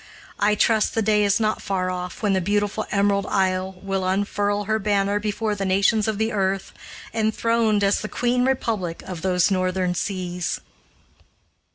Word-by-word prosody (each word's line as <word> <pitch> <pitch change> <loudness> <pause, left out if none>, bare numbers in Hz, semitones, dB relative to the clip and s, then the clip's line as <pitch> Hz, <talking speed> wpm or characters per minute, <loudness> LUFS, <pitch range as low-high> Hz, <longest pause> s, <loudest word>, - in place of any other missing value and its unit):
I 210 +1 +3
trust 220 0 +2
the 225 - +1
day 210 0 +3
is 200 0 +2
not 215 -1 0
far 185 -2 -1
off 180 +3 -6
when 205 -2 +2
the 190 - +1
beautiful 205 +3 -1
Emerald 200 0 +1
Isle 190 -1 0
will 195 -1 -1
unfurl 205 +2 0
her 220 +2 0
banner 200 0 +1
before 210 +1 -1
the 200 -1 -3
nations 200 +3 +2
of 215 -2 -1
the 220 +2 0
earth, 195 -2 -1 0.4
enthroned 220 -1 +1
as 200 0 +2
the 215 - -5
Queen 245 0 +1
Republic 220 -10 -1
of 180 -3 -6
those 180 +1 +2
northern 185 -1 0
seas! 180 -2 -3
200 Hz, 165 wpm, -23 LUFS, 190-215 Hz, 0.4 s, I